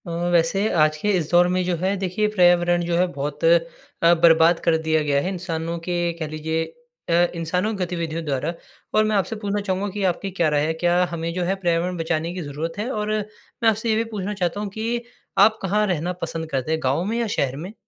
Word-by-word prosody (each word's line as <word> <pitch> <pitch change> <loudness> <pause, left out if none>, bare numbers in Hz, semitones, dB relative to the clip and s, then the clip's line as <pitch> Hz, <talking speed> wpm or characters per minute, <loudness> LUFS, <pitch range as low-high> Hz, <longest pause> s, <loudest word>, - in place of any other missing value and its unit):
अ, - - -5 0.2
वैसे 170 +3 +3 0.2
आज 155 0 +2
के 205 +7 -1
इस 160 -3 -2
दौर 175 0 +5
में 185 - +1
जो 180 -1 0
है 190 +4 0
देखिए 195 +4 0
पर्यावरण 175 -3 +3
जो 170 0 0
है 180 - +4
बहुत 145 +1 -5
अ, 170 0 +2
बर्बाद 165 0 +6
कर 165 -1 +5
दिया 160 0 +3
गया 145 -1 +2
है 180 - -2
इंसानों 170 -2 -3
के 175 +1 -3 0.2
कह 160 - -3
लीजिए 160 +1 -2 0.5
अ, - - +2 0.2
इंसानों 180 +6 -1
की 190 - -2
गतिविधियों 165 -2 -3
द्वारा। 145 +3 -1 0.4
और 215 - +4
मैं 215 0 +1
आपसे 195 +2 0
पूछना 205 0 -1
चाहूँगा 190 +2 -1
कि 205 -1 -3
आपकी 195 +3 -6
क्या 170 -4 +1
राय 145 0 +1
है, 160 - 0
क्या 175 +2 +2
हमें 165 0 -3
जो 180 +1 -1
है 185 +3 0
पर्यावरण 175 -1 0
बचाने 165 0 -1
की 180 - -5
ज़रूरत 155 +3 -5
है? 220 +4 -2
और 210 -3 -2
मैं 215 +2 -2
आपसे 220 +1 -1
ये 220 - +3
भी 225 - +1
पूछना 200 +1 -3
चाहता 185 -1 -2
हूँ 205 -1 -3
कि 225 +4 -2 0.4
आप 220 +2 +5
कहाँ 210 +3 +1
रहना 180 -1 -1
पसंद 165 -1 -4
करते 135 +2 -1
हैं 160 - +1
गाँव 135 +6 +1
में 225 +3 -1
या 235 - 0
शहर 135 -1 0
में? 175 +8 -7
175 Hz, 230 wpm, -23 LUFS, 160-195 Hz, 0.5 s, बर्बाद